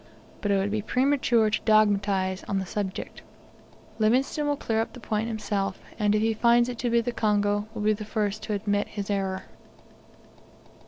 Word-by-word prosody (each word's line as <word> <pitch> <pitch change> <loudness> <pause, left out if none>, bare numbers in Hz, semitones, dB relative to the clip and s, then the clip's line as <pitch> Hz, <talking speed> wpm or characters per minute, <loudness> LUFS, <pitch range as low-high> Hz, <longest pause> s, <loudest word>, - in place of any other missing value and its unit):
But 205 - -1
it 200 - +3
would 195 +1 0
be 215 0 0
premature 250 -2 +2
to 215 - 0
dogmatise 200 -3 +2
on 195 - -1
the 190 - -1
subject. 190 0 -5 0.8
Livingstone 260 +7 +2
will 290 - +1
clear 225 -5 -1
up 225 - -4
the 250 - -10
point 220 -1 -2
himself; 205 -4 -2 0.2
and 210 0 +3
if 215 - +2
he 225 0 +2
finds 235 +2 +4
it 240 -2 -6
to 245 - 0
be 235 0 +3
the 245 - -2
Congo, 205 -2 +1
will 215 - -3
be 215 0 +4
the 215 +1 -5
first 210 -1 -2
to 215 - -2
admit 205 0 0
his 205 -1 -5
error. 190 -1 -1
215 Hz, 190 wpm, -26 LUFS, 205-230 Hz, 0.8 s, finds